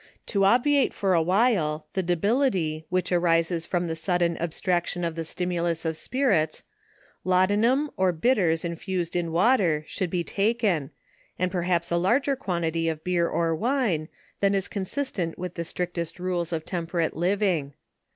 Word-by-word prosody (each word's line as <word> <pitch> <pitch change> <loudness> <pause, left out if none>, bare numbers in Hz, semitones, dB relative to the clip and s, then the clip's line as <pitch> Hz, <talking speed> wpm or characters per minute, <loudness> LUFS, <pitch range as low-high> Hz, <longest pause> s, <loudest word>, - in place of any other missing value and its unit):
To 195 -1 +3
obviate 260 +6 +3
for 195 -2 +1
a 170 - +4
while, 180 -5 +1
the 190 - 0
debility 175 - 0
which 180 0 -1
arises 165 -1 +2
from 175 -1 0
the 165 -1 -3
sudden 175 0 0
ab 170 - -2
straction 175 0 -1
of 165 - -2
the 165 0 -4
stimulus 170 -1 -1
of 160 0 -1
spirits, 195 - 0 0.6
laudanum, 210 +10 +2
or 190 -1 +3
bitters 175 -3 +1
in 170 0 -3
fused 180 -2 -3
in 170 -2 -1
water, 175 -4 +3
should 185 +2 -3
be 175 0 -1
taken, 200 - 0 0.5
and 185 0 0
perhaps 175 -2 0
a 170 - +2
larger 255 +10 +2
quan 180 -9 -3
tity 165 0 0
of 155 0 -8
beer 175 -2 +1
or 165 -1 0
wine, 210 - 0 0.3
than 200 0 +2
is 195 -1 0
consistent 195 -4 -3
with 180 -1 -5
the 170 - -4
strict 175 +1 -4 0.2
rules 175 -2 -2
of 160 -2 -3
temperate 170 -2 -2
living. 175 -5 0
175 Hz, 160 wpm, -26 LUFS, 165-195 Hz, 0.6 s, a